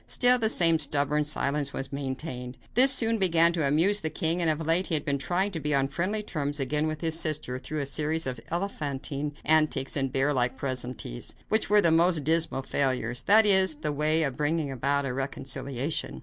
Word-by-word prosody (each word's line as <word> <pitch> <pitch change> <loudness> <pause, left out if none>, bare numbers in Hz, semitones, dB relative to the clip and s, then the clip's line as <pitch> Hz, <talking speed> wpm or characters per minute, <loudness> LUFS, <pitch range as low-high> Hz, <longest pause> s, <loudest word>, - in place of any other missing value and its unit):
Still 250 0 +3
the 220 -1 +2
same 165 -6 +3
stubborn 150 0 -1
silence 145 -1 -1
was 135 +1 -6
maintained. 130 -2 -6 0.2
This 260 +4 +8
soon 230 -4 +3
began 170 -2 +3
to 160 -4 -1
amuse 175 +9 +3
the 160 - -2
king, 165 +3 -1
and 165 - +2
of 155 +1 -2
late 165 +4 +2
he 165 - 0
had 150 - -1
been 140 -1 -1
trying 185 +7 -1
to 165 - -5
be 150 -1 -1
on 135 0 0
friendly 190 +9 -2
terms 145 -6 -3
again 150 +3 -1
with 155 0 -5
his 160 -1 +1
sister 150 -6 -2
through 155 +3 -5
a - - -3
series 155 +4 0
of 130 -2 -4
elephantine 150 -5 -4
antics 155 -4 +2
and 135 -2 -2
bear 135 +3 0
like 125 0 -1
pleasantries, 125 - -5
which 220 +1 +1
were 210 0 +5
the 170 - +3
most 165 -1 +2
dismal 160 -3 0
failures 130 -3 -2
that 220 +2 +5
is, 190 -5 +5
in 145 - -22
the 150 - -2
way 155 +2 +1
of 135 -4 -2
bringing 150 -1 -1
about 140 +2 -1
a 125 - -3
reconciliation. 135 +1 -4
150 Hz, 205 wpm, -26 LUFS, 140-170 Hz, 0.2 s, This